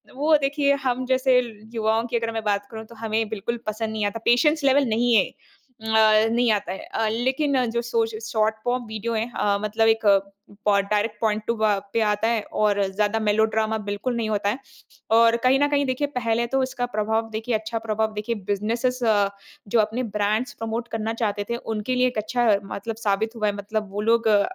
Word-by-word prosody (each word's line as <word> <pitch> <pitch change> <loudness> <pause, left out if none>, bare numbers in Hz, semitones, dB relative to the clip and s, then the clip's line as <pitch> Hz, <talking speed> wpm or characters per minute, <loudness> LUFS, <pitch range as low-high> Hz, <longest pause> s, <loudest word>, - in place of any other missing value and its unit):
वो 305 +3 +3
देखिए, 280 +1 +2
हम 255 -2 -1
जैसे 260 0 +3 0.4
युवाओं 225 0 +1
की 235 - -1
अगर 230 0 -2
मैं 225 -1 -3
बात 205 -1 -1
करूँ 220 -1 -7
तो 235 - -13
हमें 220 0 -1
बिल्कुल 220 +2 -3
पसंद 215 +1 -2
नहीं 215 -1 -1
आता। 205 +2 -2
पेशेंस 300 +6 +3
लेवल 275 +1 +4
नहीं 235 +2 +2
है, 200 - +5
अ, 220 -3 +1
नहीं 240 -1 +3
आता 205 -3 -1
है। 190 - -7
अ, 225 - 0
लेकिन 260 +3 +1
जो 235 +1 -1
शॉ 230 -1 0
श 220 -1 -7
शॉर्ट 220 -1 +1
फॉर्म 245 0 -1
वीडियो 220 +2 -4
है 225 +1 -1
अ, 205 -1 +1
मतलब 215 +1 +1
एक 225 0 +2 0.6
पो 205 -1 +4
डायरेक्ट 210 +2 -1
पॉइंट 215 -1 +1
टू 235 - +1
अ, 215 -2 +2
पे 230 - +2
आता 210 0 +1
है 230 -1 +1
और 205 -1 +2
ज़्यादा 210 +2 +1
मेलोड्रामा 220 +1 +1
बिल्कुल 210 +5 -2
नहीं 225 -2 -1
होता 205 -1 0
है। 235 +6 -2 0.6
और 230 0 +5
कहीं 260 +1 +4
न 290 - +3
कहीं 285 -1 +1
देखिए, 260 +2 -1
पहले 235 -1 0
तो 270 +2 0
इसका 255 -1 -2
प्रभाव 220 +1 0
देखिए 220 +2 -2
अच्छा 220 +1 -3
प्रभाव 220 -1 -1
देखिए 215 +2 -3 0.2
बिज़नेसेज़ 235 +5 -1
अ, 205 -3 +3 0.4
जो 225 +3 +2
अपने 220 +4 0
ब्रांड्स 215 +6 0
प्रमोट 225 +1 -3
करना 225 0 -2
चाहते 205 -1 -1
थे, 235 - 0
उनके 225 +2 -3
लिए 250 0 +3
एक 245 - -4
अच्छा 235 +2 +1 0.2
मतलब 220 +3 -5
साबित 215 +3 0
हुआ 215 -2 0
है। 205 - +1
मतलब 210 +1 -4
वो 205 - -3
लोग 230 -1 +2
अ, 205 -2 +5
225 Hz, 210 wpm, -24 LUFS, 215-240 Hz, 0.6 s, है